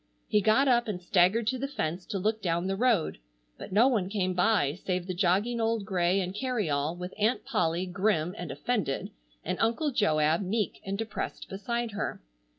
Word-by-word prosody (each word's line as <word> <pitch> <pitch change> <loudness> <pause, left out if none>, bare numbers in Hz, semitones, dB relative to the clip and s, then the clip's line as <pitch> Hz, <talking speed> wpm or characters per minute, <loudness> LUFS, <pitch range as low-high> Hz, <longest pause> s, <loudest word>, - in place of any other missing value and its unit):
He 210 - +3
got 220 +7 +4
up 240 -2 +3
and 200 -4 -3
staggered 185 +5 +3
to 255 +4 0
the 275 - -2
fence 175 - -3
to 200 - -3
look 215 +3 0
down 170 -1 0
the 195 0 0
road, 215 - +1 0.4
but - - -8
no 220 +6 +5
one 210 -8 +1
came 190 -3 0
by 180 -6 +2
save 180 0 -3
the 185 - -3
jogging 200 +6 +1
old 225 -2 0
gray 185 -1 +1
and 185 -1 -2
carryall, 180 - -1
with 180 +1 -6
Aunt 220 +5 +1
Polly 180 -8 0
grim 185 -2 0
and 175 -5 -6
offended 145 - -2 0.3
and - - -2
Uncle 235 +7 +1
Joab 160 - +2
meek 205 +1 -2
and 195 +1 -3
depressed 225 +1 -5
beside 235 +4 -3
her. 205 +1 -3
195 Hz, 185 wpm, -29 LUFS, 180-225 Hz, 0.4 s, no